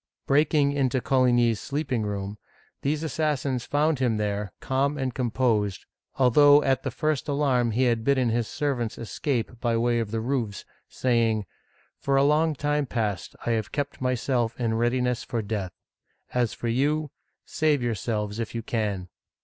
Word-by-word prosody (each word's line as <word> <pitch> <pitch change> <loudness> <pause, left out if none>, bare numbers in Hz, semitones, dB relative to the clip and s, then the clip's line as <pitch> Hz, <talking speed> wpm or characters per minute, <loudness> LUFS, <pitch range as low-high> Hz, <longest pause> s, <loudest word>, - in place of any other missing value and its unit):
Breaking 145 0 +3
into 135 -2 +1
Coligny's 120 -4 +3
sleeping 140 -4 -2
room, 100 0 -4 0.4
these 150 +3 -1
assassins 140 -5 -1
found 150 0 +1
him 120 -4 +1
there, 105 -2 -2
calm 140 +2 0
and 130 -2 -2
composed, 115 -6 0 0.3
although 145 +3 +6
at 135 -1 +2
the - - -2
first 155 -3 -1
alarm 140 -5 +2
he 120 +4 +1
had 115 -3 +1
bidden 130 -2 +2
his 115 -1 0
servants 130 -6 -2
escape 120 0 -3
by 120 -2 +1
way 120 0 +2
of 115 -3 -2
the 115 +1 -2
roofs, 115 -4 -2 0.2
saying: 115 -4 +1 0.3
" - - -36
For 140 - +1
a 135 - +5
long 155 +2 +3
time 145 0 0
past 105 -8 -2
I 120 - +1
have 110 -3 -1
kept 145 -2 -3
myself 125 -2 0
in 115 -2 0
readiness 120 +1 0
for 115 -2 -3
death. 100 -3 -3 0.6
As 120 -3 +1
for 120 - -4
you, 145 +5 0 0.3
save 150 -4 +1
yourselves 110 -2 -2
if 115 0 -4
you 115 - -3
can 105 -6 -2
125 Hz, 160 wpm, -26 LUFS, 115-140 Hz, 0.6 s, although